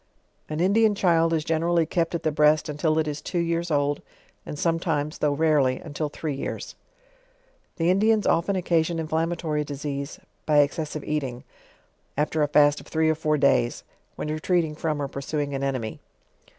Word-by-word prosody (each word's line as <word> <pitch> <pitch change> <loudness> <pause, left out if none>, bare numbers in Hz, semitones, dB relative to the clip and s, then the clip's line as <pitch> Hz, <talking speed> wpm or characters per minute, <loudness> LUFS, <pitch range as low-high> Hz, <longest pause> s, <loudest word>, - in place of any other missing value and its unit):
An 155 0 -3
Indian 205 +4 +3
child 165 -4 +3
is 160 -2 0
generally 165 +1 +2
kept 165 +1 -1
at 165 - -3
the 155 - +1
breast 150 +1 +3
until 155 +1 0
it 160 -1 +1
is 150 0 -4
two 180 - -4
years 170 0 0
old, 145 -1 +1 0.5
and 150 - -5
sometimes, 160 -2 -1
though 145 -1 +1
rarely, 145 -4 +2
until 150 -1 -4
three 150 0 -4
years. 135 - -5 1.0
The 170 +1 +2
Indians 215 +2 +3
often 185 +4 +2
occasion 170 -2 +1
inflammatory 160 -1 -1
disease, 140 0 -5 0.3
by 150 -1 +6
ex 145 0 0
cessive 155 -1 -4
eating, 135 -5 -3 0.7
after 155 +1 0
a 150 - +3
fast 145 0 +4
of - - -16
three 160 0 +2
or - - +2
four 155 -1 0
days, 135 -4 +2 0.3
when - - -4
retreat* 165 +3 +1
ing 155 - -6
from 155 -1 -2
or 140 - -1
pursuing 140 +1 -3
an 135 - -2
enemy. 130 -5 -2
155 Hz, 175 wpm, -25 LUFS, 145-165 Hz, 1.0 s, by